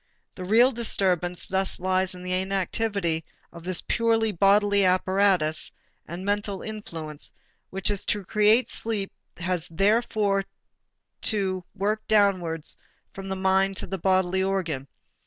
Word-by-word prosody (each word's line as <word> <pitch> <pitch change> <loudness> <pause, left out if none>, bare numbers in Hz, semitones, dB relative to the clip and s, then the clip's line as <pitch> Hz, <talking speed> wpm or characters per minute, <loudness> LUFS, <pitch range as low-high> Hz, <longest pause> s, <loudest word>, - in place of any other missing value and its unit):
The 185 - -8
real 235 +7 +5
disturbance 185 -7 -1
thus 190 0 -1
lies 185 0 0
in 180 - -10
the 180 0 -3
inactivity 190 -2 -1 0.3
of 170 -1 -11
this 185 0 0
purely 225 -1 +2
bodily 200 +2 +3
apparatus 185 -3 +2 0.4
and 175 +3 -6
mental 205 -1 -2
influence 165 -9 -7 0.4
which 195 +1 +1
is 205 -1 -1
to 205 -2 -1
create 215 +5 +3
sleep 210 -4 -1 0.3
has 175 -1 -2
therefore 200 +1 +1 0.8
to 190 -4 0
work 210 +2 -1
downwards 185 -7 +1 0.4
from 195 0 -8
the 190 - -2
mind 190 0 +1
to - - -5
a - - 0
bodily 190 0 +2
organ. 175 -8 -2
190 Hz, 130 wpm, -25 LUFS, 180-205 Hz, 0.8 s, real